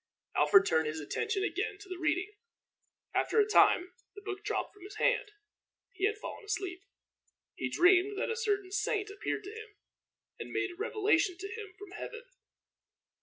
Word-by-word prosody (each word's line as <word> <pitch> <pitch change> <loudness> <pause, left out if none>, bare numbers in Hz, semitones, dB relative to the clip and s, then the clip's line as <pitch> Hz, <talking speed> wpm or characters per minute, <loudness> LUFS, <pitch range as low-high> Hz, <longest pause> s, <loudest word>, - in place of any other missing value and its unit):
Alfred 390 -2 +6
turned 160 -1 +2
his 155 +1 -3
attention 390 - -1
again 395 +2 -1
to 405 0 -13
his 365 -1 -5
reading. 360 +5 0 0.8
After 450 - +2
a 420 - +6
time 365 -3 +4 0.2
the 405 - -9
book 400 -1 -5
dropped - - -2
from 410 - -19
his 400 +3 -10
hand. - - +2 0.6
He 380 +1 +2
had 430 0 -2
fallen 430 - -7
asleep. 385 -3 -3 0.7
He - - -3
dreamed 370 +3 +4
that 435 - -1
a - - -1
certain 410 -4 -1
saint 410 +1 0
appeared 410 +1 -3
to 395 - -7
him, 435 -1 -10 0.6
and - - -6
made 405 -3 -1
a - - -11
revelation 400 -4 +1
to 385 +2 -5
him 420 -5 -8
from 410 -2 -11
heaven. 460 +4 -7
405 Hz, 170 wpm, -32 LUFS, 365-425 Hz, 0.8 s, Alfred